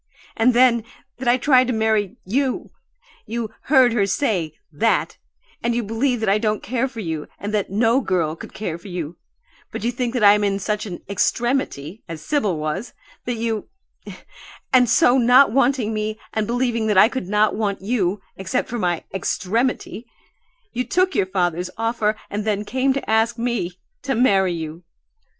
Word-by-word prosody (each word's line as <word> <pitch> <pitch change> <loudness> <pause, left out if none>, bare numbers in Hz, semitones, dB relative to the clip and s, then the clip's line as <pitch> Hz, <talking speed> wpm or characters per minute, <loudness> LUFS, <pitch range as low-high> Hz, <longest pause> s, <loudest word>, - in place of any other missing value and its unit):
"And 235 +2 +3
then 240 -2 +5 0.4
that 260 - -4
I 240 +1 +5
tried 255 -1 +4
to 250 - 0
marry 220 -3 +1
you! 255 +6 -1 0.6
You 225 -1 -4
'heard 260 -4 +5
her 205 -4 +2
say' 195 - 0 0.2
that - - 0 0.4
and 235 0 0
you 240 - 0
believe 230 +3 0
that 220 - -1
I 200 +2 +3
don't 215 -1 -1
care 255 +2 -1
for 245 -4 -7
you 160 -5 -4
and 205 +1 -5
that 205 -2 0
'no 225 +6 +2
girl' 170 -6 0
could - - -10
care 175 -5 -5
for 175 - -13
you 175 -3 -5 0.5
but - - -6
you 240 - +1
think 245 0 -3
I 205 -4 +7
am 210 0 +1
in 200 -1 +1
such 210 +2 -2
an 175 -3 -7
'extremity,' 200 - -1
as 155 -2 -7
Sibyl 215 - 0
was 155 +10 -4 0.3
that 245 - -2
you 225 +1 -3 1.0
And 250 -2 +5
so, 255 0 +5
not 245 +1 +6
wanting 250 -3 +2
me, 215 0 -3
and 215 -1 -1
believing 235 -2 0
that 210 -3 +2
I 200 - +8
could 255 -6 -4
not 210 +2 +2
want 205 -3 -2
you 200 -3 0
except 195 +7 -2
for 240 - -3
my 175 -4 0
'extremity' 225 +5 -2 0.7
you 250 - -1
took 370 +6 +1
your 185 - +1
father's 180 -2 -1
offer 225 -1 0
and 210 +1 -3
then 210 -1 -1
came 260 +4 +1
to 275 - -4
ask 225 +2 +2
me 230 -7 -2 0.2
to 270 -2 -1
marry 195 -6 +3
you! 160 0 -6
220 Hz, 175 wpm, -21 LUFS, 195-245 Hz, 1.0 s, I